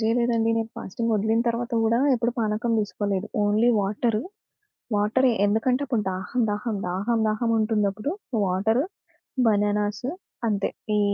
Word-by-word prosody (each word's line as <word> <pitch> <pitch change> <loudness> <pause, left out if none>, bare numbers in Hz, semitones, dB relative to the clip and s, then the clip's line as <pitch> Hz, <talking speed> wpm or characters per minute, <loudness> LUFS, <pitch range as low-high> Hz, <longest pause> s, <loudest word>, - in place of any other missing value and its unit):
జేయలేదండి. 230 0 +2
నేను 225 0 -3
ఫాస్టింగ్ 230 +4 -2
ఒదిలిన 220 +2 +1
తరువాత 235 +2 -2
గూడా 225 +1 +3 0.2
ఎప్పుడూ 240 0 0
పానకం 220 +2 0
దీసుకోలేదు. 205 -1 -2 0.2
ఓన్లీ 210 +3 +3
వాటరు 215 +3 0 0.7
వాటరే, 220 +6 +3 0.2
ఎందుకంటే 225 +5 +1
అప్పుడు 235 -6 0
దాహం, 190 +7 -3
దాహం, 210 +1 -2
దాహం, 200 +6 0
దాహం 215 +2 0
ఉంటుందప్పుడు. 215 +2 0 0.3
వాటరు, 210 +8 +1 0.6
బనానాస్ 205 +1 +1 0.4
అంతే. 205 -2 0 0.3
ఈ - - +3
220 Hz, 125 wpm, -25 LUFS, 205-235 Hz, 0.7 s, గూడా